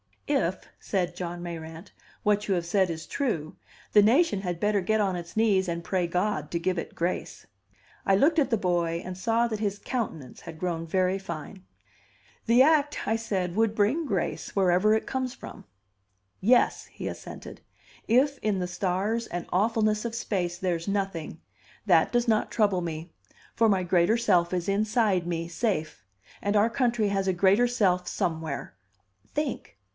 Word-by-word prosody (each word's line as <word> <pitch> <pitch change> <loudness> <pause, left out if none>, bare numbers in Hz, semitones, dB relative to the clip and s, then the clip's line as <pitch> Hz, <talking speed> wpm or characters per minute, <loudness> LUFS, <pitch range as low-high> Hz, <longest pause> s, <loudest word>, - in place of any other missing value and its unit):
"If," 190 -11 0
said 180 -3 -2
John 175 -1 -5
Mayrant, 165 -1 -8 0.3
"what 210 0 +1
you 195 - +2
have 175 -1 -2
said 190 +1 +2
is 160 -1 -5
true, 170 - -2 0.3
the 210 - +7
nation 225 - +3
had 175 -3 -4
better 210 0 +2
get 215 +4 +1
on 195 -3 +1
its 170 -1 -8
knees 200 -4 +3
and 170 0 -3
pray 180 -1 0
God 180 -3 -1
to 170 - 0
give 180 +1 0
it - - -7
grace." 175 +2 -3 0.6
I 195 - +4
looked 310 - +4
at 280 - +2
the 230 - +2
boy 170 -3 0
and 185 0 -5
saw 230 +5 +1
that 215 -2 -4
his 205 -2 -1
countenance 195 - -4
had 165 -2 -9
grown 165 -1 -3
very 185 +2 +1
fine. 155 - -8 0.8
"The 240 +3 +6
act," 295 -1 +3
I 220 +2 +1
said, 190 -6 -2
"would 225 -1 +2
bring 230 +11 +2
grace, 195 - -3
wherever 190 +2 +4
it 220 - -1
comes 260 -1 -3
from." - - -11 0.7
"Yes," 240 +6 +3
he - - -7
assented. - - -8 0.5
"If 275 +4 +3
in 210 -2 0
the 180 -1 -2
stars 195 +6 -1
and 175 0 -4
awfulness 215 +2 +1
of 230 -1 -3
space 180 -6 -2
there's 175 -2 -2
nothing, 195 -5 -3 0.4
that - - +4
does 240 0 +1
not 220 -2 +2
trouble 200 -5 +2
me; 165 0 -5 0.4
for 230 - +3
my 190 -3 +2
greater 180 +5 +3
self 180 -7 +2
is 180 +1 -1
inside 205 -3 +1
me, 165 -1 -2
safe. 170 -5 -2 0.4
And 205 +1 0
our 210 +2 +4
country 235 -3 +1
has 195 -1 -1
a 190 - +2
greater 195 +6 +4
self 185 -7 +1
somewhere. 160 -3 -3 0.6
Think!" 295 - -3
195 Hz, 170 wpm, -27 LUFS, 175-225 Hz, 0.8 s, the